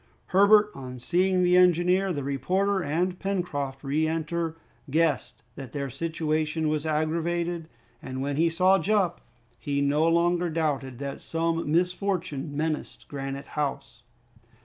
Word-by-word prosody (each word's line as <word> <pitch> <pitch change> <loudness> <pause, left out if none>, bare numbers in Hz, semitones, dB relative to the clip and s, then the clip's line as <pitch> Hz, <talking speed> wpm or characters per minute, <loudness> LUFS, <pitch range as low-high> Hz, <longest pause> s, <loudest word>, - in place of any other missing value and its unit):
Herbert, 210 +2 +6
on 130 -2 -8
seeing 180 +7 +2
the 180 0 +4
engineer, 180 +1 +4
the 145 -5 -3
reporter, 185 +9 0
and 175 +5 -1
Pencroft 145 -9 -3
re 150 +3 +1
enter, 165 +1 -2 0.3
guessed 155 -4 0
that 135 -4 -9
their 140 -2 -3
situation 155 0 -1
was 155 0 -1
aggravated, 165 +2 -1 0.3
and 130 0 -6
when 140 +1 -2
he 165 +3 +3
saw 185 +3 +4
Jup, 195 -4 +1 0.4
he 140 -1 -1
no 145 +3 +2
longer 170 +1 +2
doubted 145 -6 -1
that 140 +1 -5
some 165 -1 -1
misfortune 175 -4 -1
menaced 155 0 -3
Granite 140 0 -5
House. 140 -4 -3
160 Hz, 130 wpm, -27 LUFS, 140-180 Hz, 0.4 s, Herbert